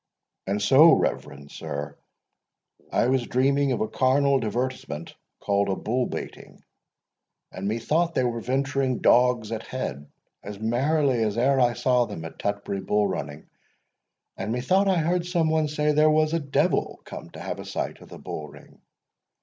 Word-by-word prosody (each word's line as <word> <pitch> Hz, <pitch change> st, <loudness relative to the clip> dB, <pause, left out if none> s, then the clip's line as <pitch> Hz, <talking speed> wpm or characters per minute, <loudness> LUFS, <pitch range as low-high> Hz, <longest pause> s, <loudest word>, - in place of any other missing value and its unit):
—And 100 Hz, +2 st, 0 dB
so, 135 Hz, +11 st, +7 dB
reverend 70 Hz, 0 st, -2 dB
sir, 70 Hz, 0 st, -6 dB, 1.0 s
I -, -, +2 dB
was 130 Hz, -2 st, +1 dB
dreaming 140 Hz, +2 st, +2 dB
of 125 Hz, -, -1 dB
a 110 Hz, -, 0 dB
carnal 135 Hz, +2 st, +2 dB
divertisement 115 Hz, -, -4 dB, 0.3 s
called 100 Hz, 0 st, 0 dB
a 95 Hz, -, 0 dB
bull 125 Hz, +5 st, -1 dB
baiting; -, -, -8 dB, 0.9 s
and 95 Hz, +1 st, -5 dB
methought 155 Hz, +11 st, 0 dB
they 130 Hz, -, +2 dB
were 120 Hz, -1 st, -1 dB
venturing 130 Hz, +1 st, 0 dB
dogs 125 Hz, -3 st, +3 dB
at 110 Hz, -1 st, -3 dB
head, 75 Hz, -, -6 dB, 0.3 s
as 100 Hz, 0 st, -8 dB
merrily 130 Hz, +3 st, +1 dB
as 105 Hz, 0 st, -1 dB
e'er 135 Hz, +3 st, +3 dB
I 120 Hz, -1 st, +3 dB
saw 125 Hz, 0 st, +2 dB
them 80 Hz, -7 st, -7 dB
at 80 Hz, -, -10 dB
Tutbury 100 Hz, -1 st, -3 dB
bull 105 Hz, +1 st, +1 dB
running; 75 Hz, -5 st, -5 dB, 0.9 s
and 110 Hz, -, -4 dB
methought 180 Hz, -, +2 dB
I 190 Hz, -2 st, +3 dB
heard 170 Hz, +2 st, 0 dB
some 170 Hz, -3 st, +1 dB
one 155 Hz, -1 st, +2 dB
say, 150 Hz, 0 st, 0 dB
there 150 Hz, +1 st, +4 dB
was 155 Hz, 0 st, +3 dB
the 165 Hz, -, +1 dB
Devil 140 Hz, -3 st, 0 dB
come -, -, -9 dB
to -, -, -9 dB
have -, -, -5 dB
a -, -, -6 dB
sight -, -, -4 dB
of -, -, -14 dB
the -, -, -10 dB
bull -, -, -6 dB
ring. -, -, -17 dB
125 Hz, 165 wpm, -25 LUFS, 105-145 Hz, 1.0 s, so